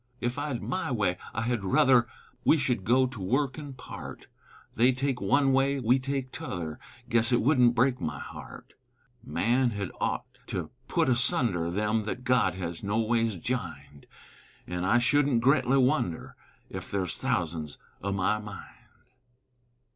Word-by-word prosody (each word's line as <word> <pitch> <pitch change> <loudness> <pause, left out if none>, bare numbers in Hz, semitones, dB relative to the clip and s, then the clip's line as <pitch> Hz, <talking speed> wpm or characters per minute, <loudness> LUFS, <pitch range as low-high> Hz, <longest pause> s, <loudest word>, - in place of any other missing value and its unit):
Ef 120 +1 -2
I'd 145 -5 -3
my 185 +1 -2
way 100 -7 +1 0.2
I 110 - -2
hed 120 -3 -1
ruther 120 +5 +4 0.4
We 160 - +5
should 125 -8 0
go 130 +3 +4
to 125 -5 -6
work 130 +8 0
an' 145 -2 -7
part, 130 - -9 0.5
They 125 +3 +4
take 130 0 -2
one 135 +7 +3
way, 135 +1 +2
we 125 +2 +3
take 135 -1 -3
t'other, 80 -4 -5 0.3
Guess 115 0 +3
it 120 - +4
wouldn't 125 -2 +4
break 125 +1 +2
my 75 -3 -3
heart; - - -10 0.5
Man 120 +4 +1
hed 100 -4 -4
ough' - - -1 0.2
to - - -4 0.2
put - - +1
asunder 120 - +2
Them 105 +4 0
thet 125 +4 -4
God 125 -8 +2
has 85 -2 -5
noways 115 +1 +1
jined; 75 - -5 0.6
An' 90 0 -3
I 110 +6 +4
shouldn't 135 -1 +2
gretly 135 -1 +4
wonder 130 - 0 0.4
Ef - - -6
there's 95 -4 -1
thousands 80 -3 -2 0.2
o' 100 - -2
my 100 +2 +1
mind. 105 -2 -9
120 Hz, 150 wpm, -28 LUFS, 100-130 Hz, 0.6 s, We